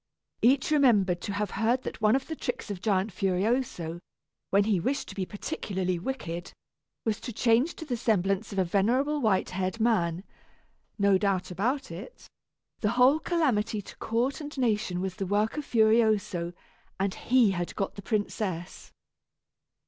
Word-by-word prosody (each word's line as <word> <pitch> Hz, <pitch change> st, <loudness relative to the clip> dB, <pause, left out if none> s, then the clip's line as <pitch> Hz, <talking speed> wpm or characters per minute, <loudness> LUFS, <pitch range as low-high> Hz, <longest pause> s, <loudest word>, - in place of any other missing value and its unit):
Each 260 Hz, +5 st, +3 dB
remembered 210 Hz, -, +4 dB
to 200 Hz, -, -4 dB
have 205 Hz, 0 st, -2 dB
heard 235 Hz, +5 st, +1 dB
that -, -, -6 dB
one 215 Hz, +2 st, +4 dB
of 270 Hz, -, -1 dB
the 320 Hz, -, -5 dB
tricks 245 Hz, -6 st, -4 dB
of 185 Hz, -3 st, -6 dB
Giant 200 Hz, -1 st, +1 dB
Furioso, 190 Hz, -3 st, -1 dB, 0.5 s
when 200 Hz, +1 st, +4 dB
he 205 Hz, -3 st, +2 dB
wished 270 Hz, +11 st, -1 dB
to -, -, -7 dB
be 190 Hz, -2 st, -2 dB
particularly 185 Hz, -3 st, -3 dB
wicked, 175 Hz, -6 st, -5 dB, 0.5 s
was 220 Hz, -1 st, 0 dB
to 245 Hz, -, -6 dB
change 240 Hz, +7 st, +2 dB
to 320 Hz, -, -8 dB
the 255 Hz, -5 st, -2 dB
semblance 200 Hz, -2 st, 0 dB
of 200 Hz, -, -6 dB
a 190 Hz, -, +4 dB
venerable 250 Hz, -, +1 dB
white 210 Hz, -6 st, +1 dB
haired 185 Hz, +4 st, -2 dB
man. 185 Hz, -7 st, +1 dB, 0.7 s
No 200 Hz, -2 st, +4 dB
doubt 195 Hz, -3 st, 0 dB
about 245 Hz, +7 st, -1 dB
it, 180 Hz, +8 st, -10 dB, 0.5 s
the 210 Hz, -, +1 dB
whole 255 Hz, +5 st, +5 dB
calamity 260 Hz, -12 st, +1 dB
to -, -, -12 dB
court 240 Hz, +6 st, -1 dB
and 295 Hz, -1 st, -8 dB
nation 210 Hz, -7 st, 0 dB
was 190 Hz, -1 st, -4 dB
the 195 Hz, -, -3 dB
work 210 Hz, +3 st, +1 dB
of 300 Hz, -1 st, -4 dB
Furioso, 220 Hz, -6 st, +2 dB, 0.5 s
and 195 Hz, 0 st, 0 dB
he 240 Hz, -4 st, +3 dB
had 175 Hz, -2 st, -3 dB
got 195 Hz, -, -2 dB
the 200 Hz, -, -9 dB
princess. 195 Hz, -4 st, -3 dB
210 Hz, 165 wpm, -28 LUFS, 190-245 Hz, 0.7 s, whole